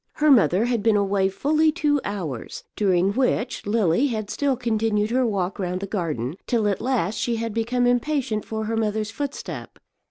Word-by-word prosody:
Her 300 0 +3
mother 215 -4 +4
had 240 -3 0
been 220 0 +3
away 195 -1 +2
fully 305 +9 +2
two 295 -3 +1
hours, 165 - -5
during 190 -2 +2
which 250 -3 -1
Lily 210 - +2
had 215 -5 -3
still 280 -3 0
continued 220 -3 0
her 255 0 +2
walk 195 -3 -2
round 180 -1 -2
the 200 - -4
garden, 160 - -3
till 230 -4 +1
at 200 -2 -1
last 225 -6 0
she 235 - 0
had 230 -1 -3
become 240 +2 0
impatient 245 -2 0
for 220 0 -4
her 225 +1 -2
mother's 215 -1 -1
footstep. 285 +3 -6
220 Hz, 180 wpm, -23 LUFS, 200-250 Hz, -, mother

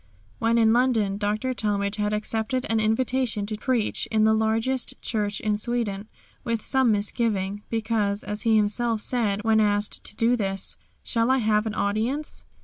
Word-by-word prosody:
When 230 +1 +2
in 225 -1 +5
London 225 -5 +2
Dr. 215 +5 -1
Talmage 205 -3 -1
had 210 0 0
accepted 220 +4 -1
an 225 - +2
invitation 225 0 0
to 215 +1 -4
preach 230 0 -1
in 220 -1 +2
the 220 0 +5
largest 225 +4 0
church 210 -2 -2
in 210 -1 -1
Sweden, 215 -3 -2 0.3
with 230 -2 -2
some 265 -3 +3
misgiving, 205 -1 -1
because, 220 -2 -1
as 210 +1 -4
he 225 -2 +3
himself 215 +2 +1
said 210 -5 -1
when 220 -1 +3
asked 205 -1 +1
to - - -6
do 230 +3 +3
this, 195 -4 -3 0.3
"Shall 230 +1 0
I 265 - +4
have 215 -2 +1
an 215 - -4
audience?" 225 +10 -2
220 Hz, 165 wpm, -25 LUFS, 210-235 Hz, 0.3 s, in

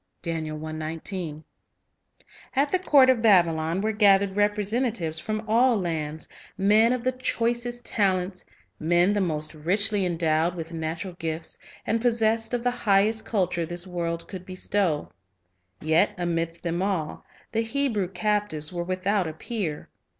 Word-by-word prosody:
1 155 0 -4 1.5
At 280 +2 +2
the 370 - +3
court 280 -7 +6
of 240 -3 0
Babylon 170 -4 +3
were 215 +1 0
gathered 200 -2 +4
representa 210 +4 +2
tives 160 -7 -3
from 215 +4 -4
all 235 +2 +4
lands, 160 -3 -3 0.3
men 210 +4 +4
of 250 -2 -1
the 255 - +2
choicest 240 -1 -1
talents, 185 -2 0 0.4
men 175 +4 +3
the 205 - +1
most 155 -3 -2
richly 200 +6 +1
endowed 165 -1 +1
with 165 -1 -6
natural 165 +3 -4
gifts, 160 0 -3 0.3
and 225 0 0
possessed 225 -1 +1
of 240 - -3
the 245 - +2
highest 215 -1 +2
culture 180 -5 0
this 175 +2 -5
world 170 -2 -3
could 185 -2 -8
bestow; 185 -3 -1 0.7
yet 165 +7 +2
amidst 170 -1 -2
them 170 +1 -1
all, 190 -6 -2 0.3
the 225 - +1
Hebrew 225 -5 0
captives 190 -5 -1
were 175 -1 -2
without 185 +1 0
a 160 - -5
peer. 180 -4 -4
190 Hz, 140 wpm, -26 LUFS, 165-220 Hz, 1.5 s, court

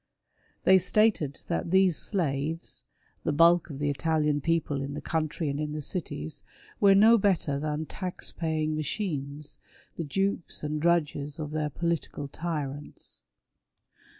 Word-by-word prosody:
They 190 0 +7
stated 185 -6 +2
that 170 0 -1
these 190 -1 +4
slaves 160 -4 -2 0.2
— - - -38
the - - +1
bulk 170 +4 +5
of 140 - -6
the 145 0 0
Italian 150 0 +1
people 155 -3 0
in 140 +1 -4
the - - -3
country 160 0 -2
and 140 0 -2
in 150 0 -2
the 150 - -3
cities 105 - -4 0.2
— - - -24
were 195 -1 +7
no 220 +3 +7
better 170 -8 +1
than 155 +1 -2
tax 180 +2 -5
paying 155 -2 -1
machines, 150 -3 -3 0.4
the 165 - -2
dupes 195 +3 -2
and 150 0 -2
drudges 150 -3 +1
of 150 -2 -5
their 150 -1 -1
political 165 -2 -2
tyrants. 145 -2 -5
155 Hz, 150 wpm, -28 LUFS, 145-175 Hz, 0.4 s, They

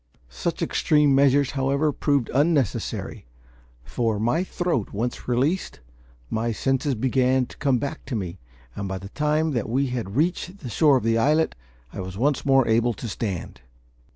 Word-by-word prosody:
Such - - -3
extreme 150 -2 +3
measures, 140 0 +4
however, 140 +2 +1
proved 140 -3 0
unnecessary; 140 - 0 0.6
for, 115 - -1
my 120 - +1
throat 175 - -2
once 115 +4 -3
released, 135 +9 0 0.5
my 115 - -1
senses 135 +4 0
began 130 +2 +2
to - - -15
come 140 -3 +2
back 140 +5 -4
to 130 - -4
me, 95 -3 -4 0.4
and 100 - -4
by 95 0 -3
the 95 +1 -9
time 150 +4 0
that 120 -5 -2
we 135 +4 +1
had 110 -5 -4
reached 180 +5 -1
the 125 -6 -6
shore 145 +2 +4
of - - -3
the 115 0 +2
islet 155 +6 +2 0.4
I - - -7
was 95 0 -6
once 140 +5 +1
more 135 -2 +4
able 115 +1 +2
to 120 - -6
stand. 100 -5 -4
130 Hz, 165 wpm, -24 LUFS, 115-145 Hz, 0.6 s, measures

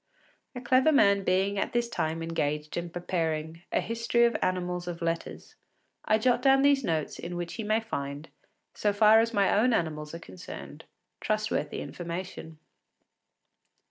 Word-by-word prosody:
A 245 - -5
clever 260 +5 +4
man 200 -8 +4
being 195 +2 +1
at - - -2
this 240 0 +1
time 165 -7 -2
engaged 150 -2 -2
in 175 0 -3
preparing 165 -2 -3
a - - +2
“History 230 +1 +1
of 235 -2 +1
Animals 180 -1 -1
of 170 -1 -5
Letters,” 165 0 -4 0.5
I 215 - +3
jot 245 +2 +2
down 270 +1 +5
these 280 -1 +4
notes 160 -7 -2
in 175 +1 -6
which 175 -1 -4
he 225 - -5
may 215 +2 +1
find, 140 -8 -5 0.5
so 205 -1 0
far 215 +1 +6
as 230 +1 +1
my 200 -3 +2
own 235 +4 +3
animals 155 -5 -2
are - - -7
concerned, 95 - -10 0.3
trustworthy 215 -8 -1
information. 170 +1 -6
185 Hz, 155 wpm, -28 LUFS, 165-225 Hz, 0.5 s, far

